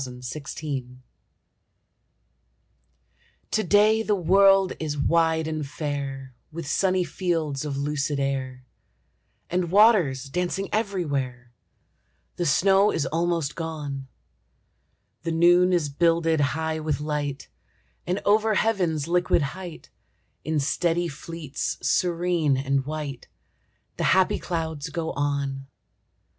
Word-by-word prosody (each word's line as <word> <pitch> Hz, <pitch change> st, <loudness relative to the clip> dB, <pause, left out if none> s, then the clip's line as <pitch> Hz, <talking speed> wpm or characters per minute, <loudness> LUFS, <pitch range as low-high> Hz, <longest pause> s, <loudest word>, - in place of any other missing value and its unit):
APRIL 125 Hz, -2 st, -6 dB
IN 125 Hz, -, -12 dB
THE 140 Hz, +3 st, -6 dB
HILLS 130 Hz, -4 st, -5 dB, 2.5 s
To 215 Hz, -, +1 dB
day 210 Hz, +4 st, +4 dB
the 215 Hz, -2 st, +1 dB
world 195 Hz, +1 st, +4 dB
is 150 Hz, -2 st, -3 dB
wide 160 Hz, +2 st, +2 dB
and 155 Hz, -1 st, -3 dB
fair 140 Hz, -2 st, -5 dB, 0.2 s
With 165 Hz, 0 st, -6 dB
sunny 185 Hz, +3 st, +2 dB
fields 165 Hz, -7 st, -2 dB
of 140 Hz, -2 st, -3 dB
lucid 145 Hz, 0 st, -1 dB
air, 130 Hz, -2 st, -3 dB, 0.9 s
And 180 Hz, -1 st, 0 dB
waters 190 Hz, -, +4 dB
dancing 180 Hz, +7 st, -2 dB
everywhere; 145 Hz, -, -2 dB, 0.9 s
The 175 Hz, -, 0 dB
snow 195 Hz, +7 st, +4 dB
is 150 Hz, -, -1 dB
almost 165 Hz, -2 st, -1 dB
gone; 150 Hz, -5 st, -5 dB, 1.1 s
The 165 Hz, -, -3 dB
noon 175 Hz, +2 st, +5 dB
is 170 Hz, -4 st, +2 dB
builded 165 Hz, +1 st, +2 dB
high 160 Hz, +3 st, -1 dB
with 155 Hz, -2 st, -2 dB
light, 150 Hz, -2 st, -3 dB, 0.6 s
And 180 Hz, +3 st, 0 dB
over 215 Hz, +1 st, +3 dB
heaven's 180 Hz, -10 st, +1 dB
liquid 175 Hz, -2 st, +2 dB
height, 180 Hz, -3 st, -9 dB, 0.5 s
In 155 Hz, -1 st, 0 dB
steady 170 Hz, +4 st, 0 dB
fleets 155 Hz, -1 st, -5 dB
serene 175 Hz, -5 st, +1 dB
and 135 Hz, 0 st, -1 dB
white, 150 Hz, -4 st, -5 dB, 0.7 s
The -, -, -1 dB
happy 190 Hz, -, +2 dB
clouds 160 Hz, -4 st, -3 dB
go 165 Hz, -2 st, -3 dB
on. 140 Hz, -1 st, -2 dB
160 Hz, 115 wpm, -25 LUFS, 140-180 Hz, 2.5 s, noon